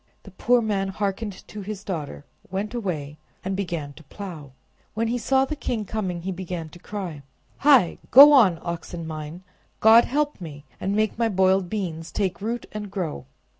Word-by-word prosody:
The 200 - -13
poor 240 +5 +2
man 200 -3 0
hearkened 200 +1 -4
to 210 - -7
his 200 0 -6
daughter, 155 -7 -5 0.2
went 195 +3 -3
away, 155 -10 -4 0.3
and 190 0 -1
began 170 -7 -4
to 160 - -15
plow. 155 -6 -9 0.4
When 225 +1 0
he 245 +1 -1
saw 265 +3 +2
the 305 - -4
king 230 -6 -3
coming 185 -5 -3
he 190 - -2
began 180 -3 -5
to 175 - -14
cry— 180 -7 -6 0.4
"Hi, 270 - +4
go 285 +3 +10
on, 205 -11 +6
oxen 170 0 -5
mine! 155 +2 -7 0.4
God 225 +2 +7
help 295 -4 -1
me, 150 -3 -9
and 195 +1 -1
make 215 +1 0
my 230 -1 +2
boiled 190 -2 +2
beans 170 -6 -4
take 195 -2 -2
root 235 +3 -3
and 210 -1 -6
grow!" 165 - -4
195 Hz, 175 wpm, -24 LUFS, 170-220 Hz, 0.4 s, go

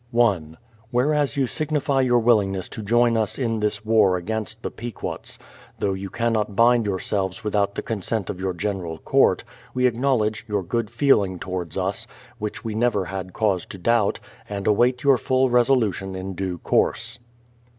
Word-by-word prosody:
1. 95 -10 +1 0.3
Whereas 145 +4 +1
you 135 - +3
signify 145 -1 0
your 125 -2 +3
willingness 105 -6 +2
to - - -6
join 120 +3 +3
us 110 -3 0
in 115 -4 -1
this 105 0 -1
war 110 -4 +4
against 110 +4 -3
the - - -3
Pequots, 120 -2 -6 0.4
though 100 -1 0
you 95 0 -5
cannot 110 -2 -1
bind 115 0 +4
yourselves 95 +1 -2
without 100 -1 0
the - - -3
consent 110 -1 -2
of 95 - -5
your 95 -1 -1
General 90 -4 -3
Court, - - +3 0.3
we 125 0 +2
acknowledge 115 -4 +1
your 105 -3 -1
good 115 +4 -2
feeling 115 -7 +2
towards 90 -2 -5
us, 95 +1 -2 0.3
which 105 +2 -5
we 110 - -2
never 110 -3 +1
had 95 0 -5
cause 100 -5 +1
to - - -8
doubt, 110 +2 +2 0.3
and 100 -1 -4
await 120 +5 +3
your 135 -3 +5
full 130 -1 +2
resolution 115 -6 +2
in 95 +1 -5
due 95 -1 -3
course. 115 +7 0
110 Hz, 165 wpm, -23 LUFS, 95-120 Hz, 0.4 s, your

